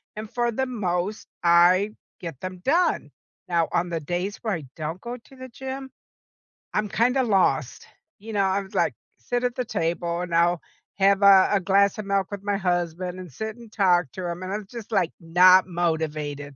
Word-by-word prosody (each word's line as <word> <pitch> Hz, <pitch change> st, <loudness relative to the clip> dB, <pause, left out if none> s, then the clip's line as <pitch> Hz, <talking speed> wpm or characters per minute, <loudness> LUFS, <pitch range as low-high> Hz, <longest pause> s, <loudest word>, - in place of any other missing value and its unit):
and 215 Hz, 0 st, -6 dB
for 240 Hz, -1 st, 0 dB
the 265 Hz, +4 st, -1 dB
most, 200 Hz, -4 st, -2 dB, 0.2 s
I 175 Hz, +4 st, +5 dB, 0.3 s
get 165 Hz, -7 st, -7 dB
them 185 Hz, -1 st, -6 dB
done. 340 Hz, +6 st, +1 dB, 0.4 s
Now, 170 Hz, -2 st, +1 dB
on 175 Hz, +1 st, 0 dB
the 165 Hz, -1 st, -2 dB
days 180 Hz, +6 st, -3 dB
where 220 Hz, -4 st, -1 dB
I 155 Hz, -5 st, -4 dB
don't 160 Hz, +3 st, -5 dB
go 245 Hz, +1 st, -6 dB
to 265 Hz, +3 st, -19 dB
the 260 Hz, 0 st, -9 dB
gym, 265 Hz, +1 st, -7 dB, 0.8 s
I'm 210 Hz, 0 st, 0 dB
kinda 250 Hz, +5 st, +2 dB
lost, 200 Hz, -5 st, +1 dB, 0.3 s
you 220 Hz, +2 st, -8 dB
know, 205 Hz, -, +2 dB
I 190 Hz, +1 st, +1 dB
was 195 Hz, +1 st, -13 dB
like, -, -, +2 dB, 0.3 s
sit 245 Hz, 0 st, -2 dB
at 245 Hz, -1 st, 0 dB
the 250 Hz, -, -2 dB
table 170 Hz, -2 st, -2 dB
and 180 Hz, -1 st, -5 dB
I'll 170 Hz, 0 st, +3 dB, 0.4 s
have 195 Hz, 0 st, +4 dB
a 195 Hz, -1 st, +7 dB
a 200 Hz, -, +4 dB
glass 200 Hz, +2 st, +3 dB
of 215 Hz, -, -5 dB
milk 195 Hz, -1 st, 0 dB
with 200 Hz, -1 st, -6 dB
my 200 Hz, -1 st, 0 dB
husband, 180 Hz, -1 st, -2 dB
and 180 Hz, -5 st, -9 dB
sit 220 Hz, +10 st, -5 dB
and 235 Hz, -2 st, -14 dB
talk 180 Hz, -8 st, +2 dB
to 180 Hz, -2 st, -4 dB
him, 170 Hz, +2 st, -5 dB
and 185 Hz, +2 st, -4 dB
I'm 210 Hz, -2 st, -5 dB
just, 230 Hz, -2 st, -9 dB
like, 185 Hz, -5 st, +1 dB
not 180 Hz, +3 st, +6 dB
motivated, 155 Hz, -4 st, -2 dB
190 Hz, 195 wpm, -25 LUFS, 175-215 Hz, 0.8 s, a